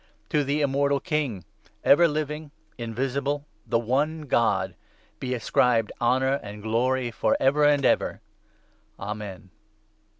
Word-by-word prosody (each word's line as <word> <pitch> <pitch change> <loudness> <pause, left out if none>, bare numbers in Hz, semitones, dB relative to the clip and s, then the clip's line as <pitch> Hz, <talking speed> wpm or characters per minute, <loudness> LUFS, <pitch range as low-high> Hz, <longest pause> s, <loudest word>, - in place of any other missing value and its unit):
To 150 -1 +2
the 140 +2 0
Immortal 140 0 +2
King, 140 - -2 0.4
ever 170 +5 +6
17 160 - +1
living, 150 0 -3 0.2
invisible, 135 +5 -2 0.2
the 115 - +2
one 145 +7 0
God, 105 -8 +1 0.5
be 130 -1 -2
ascribed 115 -1 +2
honour 130 +3 +2
and 105 0 -9
glory 120 +3 0
for - - +1
ever 145 +3 +3
and 145 -2 +4
ever. - - +2 0.8
Amen. 100 -3 -6
130 Hz, 125 wpm, -26 LUFS, 115-145 Hz, 0.8 s, ever